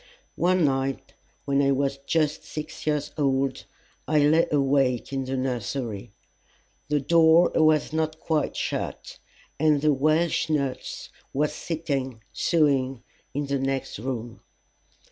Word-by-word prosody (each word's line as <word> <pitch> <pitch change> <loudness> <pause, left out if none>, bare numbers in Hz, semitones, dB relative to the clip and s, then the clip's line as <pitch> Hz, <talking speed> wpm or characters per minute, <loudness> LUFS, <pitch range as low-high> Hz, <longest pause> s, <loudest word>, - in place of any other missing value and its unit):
One 180 0 +3
night, 135 -1 -1 0.3
when 140 0 +2
I 140 - +3
was 135 0 -1
just 150 +1 0
six 155 0 -7
years 150 -1 0
old, 135 -1 0 0.4
I 155 - +2
lay 150 +3 +4
awake 135 -3 +1
in 135 -1 -2
the 130 +1 -2
nursery. 120 -4 -3 0.8
The 150 0 +2
door 165 +3 +5
was 155 -1 +3
not 160 0 -1
quite 155 -3 -1
shut, - - -4 0.4
and 150 -1 +4
the 150 0 +3
Welsh 155 +4 +1
nurse 140 -4 -2 0.2
was 150 +2 0
sitting 140 -8 -3
sewing 135 -6 +1 0.3
in 145 0 -1
the 140 0 -1
next 135 -4 -2
room. 120 -1 -5
140 Hz, 125 wpm, -25 LUFS, 135-155 Hz, 0.8 s, door